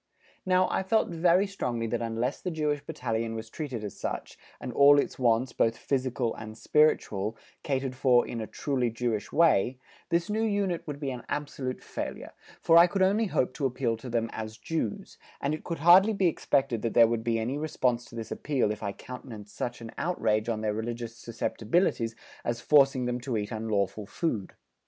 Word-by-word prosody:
Now 185 0 +4
I - - +1
felt 220 +4 +1
very 175 +3 +3
strongly 125 - -3
that 115 - -2
unless 115 +3 -2
the 180 - -2
Jewish 150 -3 -1
Battalion 115 -2 -3
was 110 0 -7
treated 135 -8 -5
as 105 - -7
such, - - -4 0.2
and 125 - -6
all 145 +1 +7
its 140 - 0
wants, 120 0 +2
both 115 0 +1
physical 130 -3 -1
and 110 0 -9
spiritual, 110 -6 +2 0.2
catered 135 -2 -2
for 125 -2 +4
in 115 - -4
a 110 - -5
truly 130 -4 -1
Jewish 115 -2 -2
way, 135 -7 +3 0.3
this 170 +2 +1
new 215 +1 -1
unit 200 -5 0
would 145 -1 -5
be 140 -2 -2
an 125 -2 -6
absolute 140 -3 -4
failure, - - -6 0.3
for 165 0 +7
I 170 - +8
could 190 +1 +1
only 210 +4 +3
hope 130 -8 0
to 135 +1 0
appeal 125 -2 -1
to 125 +3 -9
them 115 -1 -1
as 110 0 -6
Jews, 190 - -4 0.2
and 140 - -1
it 155 - -5
could 170 - -4
hardly 180 +7 +7
be 195 -2 +1
expected 135 -7 +1
that 115 - -2
there 115 - +8
would 115 -1 -1
be 115 0 +1
any 120 +6 -2
response 130 -6 0
to 120 - -13
this 115 -1 -6
appeal 135 -7 0
if 105 - -5
I 100 -2 -3
countenanced 115 -5 -10
such 120 -1 -4
an 115 -1 -8
outrage 110 -10 0
on 110 -2 -1
their 105 -1 0
religious 115 +1 -4
susceptibilities 115 - -1 0.3
as 120 0 -2
forcing 135 -2 +4
them 125 0 -1
to 120 -2 -2
eat 105 -1 -3
unlawful 110 -2 -1
food. 110 - -2
125 Hz, 195 wpm, -28 LUFS, 115-155 Hz, 0.3 s, I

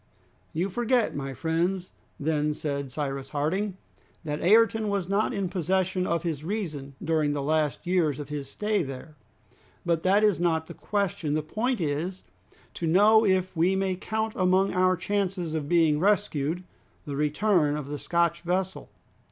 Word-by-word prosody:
"You 170 +4 -1
forget, 240 +3 +1
my 135 -1 -4
friends," 175 +5 -1 0.3
then 150 0 0
said 140 -3 -3
Cyrus 135 -1 -4
Harding, 185 +7 -1 0.5
"that 150 -2 -3
Ayrton 220 +3 +4
was 200 -3 -1
not 200 +5 +1
in 200 -5 -1
possession 185 +1 0
of 170 0 0
his 155 -4 -3
reason 155 -8 -4
during 155 -2 +1
the 145 - -2
last 155 -1 0
years 170 -6 +1
of 145 -1 -7
his 145 -2 -5
stay 210 +4 0
there. 135 +1 -7 0.7
But 170 -2 +1
that 195 +4 +3
is 210 -5 +3
not 165 -2 +1
the - - -9
question. 200 -7 -1
The 155 - 0
point 235 - -1
is 165 +4 -2 0.5
to 170 - -3
know 210 +6 +6
if 185 -2 +1
we 175 +4 +3
may 190 -1 0
count 220 +3 -2
among 185 +1 +2
our 185 0 +3
chances 185 -3 -1
of 150 -2 -3
being 160 -4 +4
rescued, 180 -4 +1 0.4
the 145 -2 -4
return 150 +1 +2
of 150 -2 -5
the 145 0 -5
Scotch 170 -1 +1
vessel. 185 +2 -2
175 Hz, 160 wpm, -27 LUFS, 150-195 Hz, 0.7 s, know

